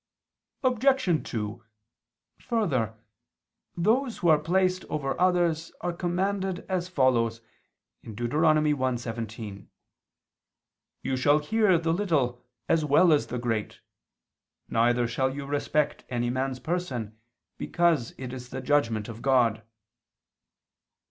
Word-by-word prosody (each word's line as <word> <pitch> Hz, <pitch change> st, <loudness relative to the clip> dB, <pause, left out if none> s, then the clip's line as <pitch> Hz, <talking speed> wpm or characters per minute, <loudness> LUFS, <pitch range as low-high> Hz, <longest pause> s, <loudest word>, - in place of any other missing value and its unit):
Obj. 255 Hz, -, +2 dB
2: 110 Hz, 0 st, -4 dB, 0.8 s
Further, 140 Hz, -, -1 dB, 0.8 s
those 230 Hz, +7 st, +1 dB
who 175 Hz, -, +1 dB
are 155 Hz, -2 st, +6 dB
placed 185 Hz, +3 st, +1 dB
over 140 Hz, +1 st, -3 dB
others 175 Hz, -3 st, +2 dB
are 175 Hz, 0 st, -2 dB
commanded 190 Hz, +2 st, -2 dB
as 185 Hz, -2 st, -2 dB
follows 120 Hz, -7 st, +2 dB, 0.6 s
(Deut. 115 Hz, +2 st, -5 dB
1:17): 125 Hz, -, 0 dB, 1.4 s
"You 135 Hz, -, -1 dB
shall 145 Hz, +3 st, +4 dB
hear 200 Hz, +4 st, +3 dB
the 165 Hz, 0 st, 0 dB
little 145 Hz, -11 st, 0 dB, 0.2 s
as 165 Hz, -1 st, +2 dB
well 155 Hz, +4 st, +5 dB
as 150 Hz, -, +1 dB
the 125 Hz, -, -4 dB
great; 115 Hz, -3 st, -2 dB, 0.9 s
neither 120 Hz, +1 st, +2 dB
shall 130 Hz, +3 st, 0 dB
you 140 Hz, -1 st, -5 dB
respect 145 Hz, +1 st, -1 dB
any 120 Hz, -1 st, -1 dB
man's 130 Hz, 0 st, -2 dB
person, 130 Hz, -12 st, -3 dB, 0.4 s
because 170 Hz, -8 st, +1 dB
it 130 Hz, -1 st, -6 dB
is 125 Hz, -1 st, -8 dB
the 130 Hz, -, -5 dB
judgment 115 Hz, -6 st, +1 dB
of 115 Hz, 0 st, -8 dB
God." 120 Hz, -5 st, +3 dB
145 Hz, 110 wpm, -27 LUFS, 120-175 Hz, 1.4 s, are